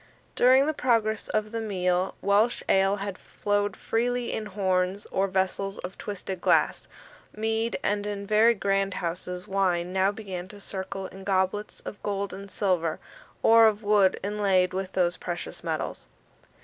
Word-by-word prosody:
During 260 Hz, +2 st, +6 dB
the 310 Hz, -, 0 dB
progress 230 Hz, -5 st, +1 dB
of 215 Hz, 0 st, -1 dB
the 230 Hz, -1 st, -3 dB
meal, 185 Hz, -3 st, 0 dB
Welsh 205 Hz, +4 st, +3 dB
ale 195 Hz, +1 st, +3 dB
had 200 Hz, -1 st, -5 dB
flowed 205 Hz, -1 st, -1 dB
freely 245 Hz, +1 st, -1 dB
in 215 Hz, -, -3 dB
horns 190 Hz, -1 st, 0 dB
or 195 Hz, +1 st, +1 dB
vessels 190 Hz, +1 st, -1 dB
of 180 Hz, +1 st, -7 dB
twisted 190 Hz, -2 st, -6 dB
glass. -, -, +2 dB, 0.5 s
Mead 225 Hz, +1 st, -1 dB
and, 205 Hz, 0 st, 0 dB
in 200 Hz, -1 st, -4 dB
very 220 Hz, +3 st, +4 dB
grand 195 Hz, -1 st, 0 dB
houses, 180 Hz, +1 st, -4 dB
wine 180 Hz, -2 st, 0 dB
now 190 Hz, +1 st, +3 dB
began 190 Hz, -4 st, -6 dB
to 205 Hz, +1 st, -12 dB
circle 195 Hz, 0 st, -5 dB
in 190 Hz, +1 st, -10 dB
goblets 190 Hz, +2 st, -1 dB
of 205 Hz, -, -8 dB
gold 200 Hz, -1 st, -2 dB
and 200 Hz, +1 st, -8 dB
silver, 180 Hz, -6 st, 0 dB, 0.4 s
or 225 Hz, 0 st, +7 dB
of 215 Hz, 0 st, 0 dB
wood 205 Hz, -2 st, +4 dB
inlaid 195 Hz, -3 st, +2 dB
with 190 Hz, 0 st, -3 dB
those 180 Hz, -1 st, +1 dB
precious 175 Hz, -1 st, -6 dB
metals. -, -, -3 dB
195 Hz, 155 wpm, -27 LUFS, 185-210 Hz, 0.5 s, or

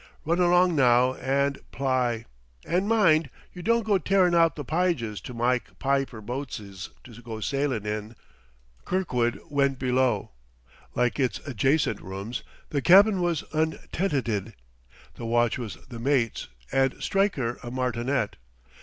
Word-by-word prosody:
Run 170 Hz, +3 st, +1 dB
along 180 Hz, 0 st, +4 dB
now 125 Hz, -2 st, +4 dB
and 140 Hz, +2 st, 0 dB
pl'y 125 Hz, -4 st, 0 dB, 0.4 s
and 185 Hz, +4 st, 0 dB
mind 165 Hz, -9 st, +4 dB, 0.2 s
you 180 Hz, -, -8 dB
don't 230 Hz, +4 st, +2 dB
go 205 Hz, -3 st, +3 dB
tearin' 185 Hz, -2 st, +3 dB
out 165 Hz, -1 st, +4 dB
the 145 Hz, -, -6 dB
pyges 150 Hz, -, -1 dB
to 125 Hz, -, -8 dB
myke 125 Hz, +1 st, -1 dB
pyper 135 Hz, -4 st, -1 dB
boatses 105 Hz, -6 st, -6 dB
to 120 Hz, -1 st, -13 dB
go 115 Hz, -2 st, -7 dB
sylin' 135 Hz, -2 st, -1 dB
in." 105 Hz, +2 st, -4 dB, 0.7 s
Kirkwood 125 Hz, -11 st, 0 dB
went 140 Hz, -2 st, +1 dB
below. 125 Hz, -5 st, +1 dB, 0.6 s
Like 125 Hz, +3 st, +1 dB
its 130 Hz, -3 st, +1 dB
adjacent 135 Hz, +3 st, +1 dB
rooms, 100 Hz, +6 st, -5 dB, 0.3 s
the 140 Hz, -, -1 dB
cabin 195 Hz, +4 st, +6 dB
was 175 Hz, -2 st, 0 dB
untenanted; 155 Hz, -, -1 dB, 0.6 s
the 120 Hz, -, -8 dB
watch 120 Hz, +1 st, +2 dB
was 115 Hz, -5 st, -5 dB
the 120 Hz, -, -8 dB
mate's, 120 Hz, -3 st, 0 dB, 0.2 s
and 135 Hz, 0 st, +2 dB
Stryker 180 Hz, -, 0 dB
a 120 Hz, -, -7 dB
martinet. 125 Hz, -1 st, -1 dB
130 Hz, 135 wpm, -26 LUFS, 120-160 Hz, 0.7 s, cabin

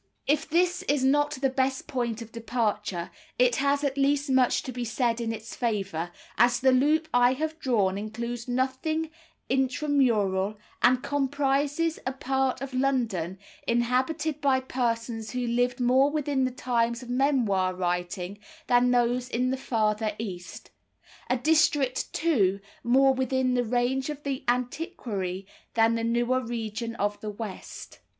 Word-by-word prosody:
If 300 Hz, +2 st, +1 dB
this 355 Hz, +2 st, +2 dB
is 285 Hz, -2 st, +2 dB
not 290 Hz, +2 st, +3 dB
the 270 Hz, 0 st, 0 dB
best 265 Hz, 0 st, 0 dB
point 240 Hz, -6 st, -2 dB
of 225 Hz, -, -14 dB
departure, 225 Hz, -6 st, -2 dB, 0.3 s
it 250 Hz, -1 st, +3 dB
has 280 Hz, +1 st, +1 dB
at 280 Hz, -1 st, -1 dB
least 280 Hz, 0 st, +2 dB
much 260 Hz, -2 st, +3 dB
to 260 Hz, -, -5 dB
be 245 Hz, 0 st, -4 dB
said 235 Hz, 0 st, 0 dB
in 225 Hz, -1 st, -1 dB
its 225 Hz, +1 st, -7 dB
favour, 195 Hz, -8 st, -2 dB, 0.3 s
as 240 Hz, +1 st, +5 dB
the 260 Hz, +1 st, +4 dB
loop 300 Hz, +5 st, +3 dB
I 245 Hz, +1 st, +5 dB
have 315 Hz, +3 st, -3 dB
drawn 205 Hz, -, +1 dB
includes 235 Hz, +3 st, -5 dB
nothing 265 Hz, +6 st, -1 dB, 0.4 s
intramural, 245 Hz, -7 st, +1 dB, 0.2 s
and 250 Hz, +1 st, +4 dB
comprises 285 Hz, +3 st, 0 dB
a 260 Hz, -, -2 dB
part 265 Hz, -1 st, -1 dB
of 275 Hz, -1 st, -5 dB
London 235 Hz, -10 st, 0 dB, 0.3 s
inhabited 260 Hz, +6 st, 0 dB
by 270 Hz, -2 st, +3 dB
persons 230 Hz, -3 st, -2 dB
who 250 Hz, -1 st, -2 dB
lived 245 Hz, +1 st, 0 dB
more 255 Hz, +3 st, +4 dB
within 290 Hz, -3 st, 0 dB
the -, -, +1 dB
times 240 Hz, -2 st, -1 dB
of 245 Hz, -, -11 dB
memoir 235 Hz, -9 st, +2 dB
writing 180 Hz, +2 st, -3 dB, 0.3 s
than 245 Hz, 0 st, +4 dB
those 245 Hz, 0 st, +1 dB
in 250 Hz, +2 st, 0 dB
the -, -, +1 dB
farther 215 Hz, -4 st, 0 dB
East, 185 Hz, -5 st, -7 dB, 0.6 s
a 255 Hz, -, +2 dB
district, 295 Hz, -2 st, +2 dB
too, 205 Hz, -, +2 dB, 0.2 s
more 265 Hz, +3 st, +5 dB
within 260 Hz, 0 st, 0 dB
the 245 Hz, -1 st, +2 dB
range 245 Hz, +4 st, 0 dB
of 295 Hz, -1 st, -6 dB
the 275 Hz, -2 st, -3 dB
antiquary 240 Hz, -, -2 dB, 0.3 s
than 225 Hz, 0 st, +4 dB
the 230 Hz, 0 st, -1 dB
newer 240 Hz, +2 st, +1 dB
region 230 Hz, 0 st, -4 dB
of 205 Hz, -1 st, -2 dB
the 215 Hz, -, -4 dB
West. 210 Hz, -1 st, -8 dB
250 Hz, 150 wpm, -27 LUFS, 230-270 Hz, 0.6 s, as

